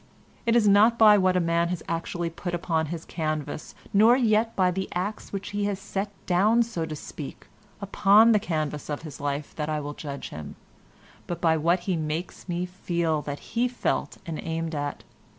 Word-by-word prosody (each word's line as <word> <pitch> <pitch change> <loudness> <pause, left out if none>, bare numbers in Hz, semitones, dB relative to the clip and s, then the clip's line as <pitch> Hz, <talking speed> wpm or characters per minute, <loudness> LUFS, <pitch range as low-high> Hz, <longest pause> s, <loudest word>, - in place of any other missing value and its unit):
It 230 - +4
is 225 -3 +4
not 210 +4 +6
by 210 -2 +7
what 185 -1 +3
a - - +4
man 170 0 +1
has 175 -2 -3
actually 165 0 -2
put 175 +1 -4
upon 165 -2 0
his 165 +1 -5
canvas, 155 -2 -4 0.2
nor 220 +5 +6
yet 225 -2 +2
by 185 -1 +3
the 190 +1 -3
acts 200 +4 -3
which 195 0 -5
he 205 0 -1
has 200 -1 -1
set 200 +1 -3 0.2
down, 210 +6 +4
so 175 -9 -4
to 155 - -5
speak, 145 -1 -8 0.4
upon 200 +3 +5
the 215 - +5
canvas 155 -5 -3
of 150 +1 -3
his 150 -4 -9
life 145 0 -3
that 150 -1 -2
I 155 -1 0
will 145 0 -5
judge 140 -2 -6
him, 75 -1 -8 0.7
but 175 -1 -4
by 165 -2 +3
what 170 +3 +2
he 185 0 -1
makes 160 +4 -4
me 175 +1 -1
feel 170 -3 -1
that 145 -1 -7
he 240 +2 +2
felt 250 0 -2
and 165 -3 -4
aimed 165 0 -3
at. 145 -1 -3
175 Hz, 195 wpm, -26 LUFS, 155-200 Hz, 0.7 s, by